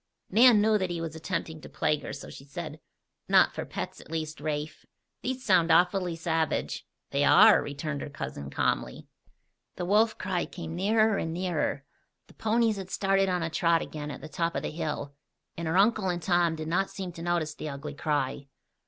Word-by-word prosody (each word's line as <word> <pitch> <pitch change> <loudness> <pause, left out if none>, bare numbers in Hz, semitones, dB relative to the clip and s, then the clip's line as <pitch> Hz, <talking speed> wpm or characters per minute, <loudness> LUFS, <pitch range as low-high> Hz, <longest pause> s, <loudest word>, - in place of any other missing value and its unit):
Nan 225 +1 +7
knew 215 0 +3
that 185 -1 -1
he 175 -1 -3
was 165 -1 -5
attempting 160 -1 -4
to - - -11
plague 150 -1 0
her, - - -6
so 135 - -8
she - - -11
said: 155 +2 -7 0.5
"Not - - +5
for - - -4
pets, - - -6
at - - -16
least, 155 -2 -4
Rafe. 150 0 -4 0.4
These 255 0 -3
sound 185 -5 +4
awfully 180 -1 +3
savage." 160 -1 -1 0.2
"They - - +1
are," - - +7
returned 145 0 -4
her - - -5
cousin 70 - -6
calmly. - - -1 0.7
The 175 - -3
wolf 215 +4 +3
cry 185 -2 -2
came 165 -2 -7
nearer 215 +3 +2
and 160 - -2
nearer. 170 -5 -1 0.4
The - - -19
ponies 225 -1 +1
had 190 -1 -6
started 195 0 +2
on 180 -2 0
a 165 - -3
trot 165 +1 +2
again 150 -1 -6
at 140 - -7
the - - -7
top 170 +2 -2
of - - -2
the - - -3
hill, 150 -3 -4 0.4
and 170 -1 -4
her 165 +3 +1
uncle 205 -1 +3
and 175 -1 -1
Tom 175 -1 +2
did 155 0 -5
not 185 +4 +1
seem 190 -3 -6
to 165 - -10
notice 170 -3 -1
the 155 - -6
ugly 140 +1 -6
cry. 140 -2 -2
170 Hz, 195 wpm, -28 LUFS, 155-190 Hz, 0.7 s, Nan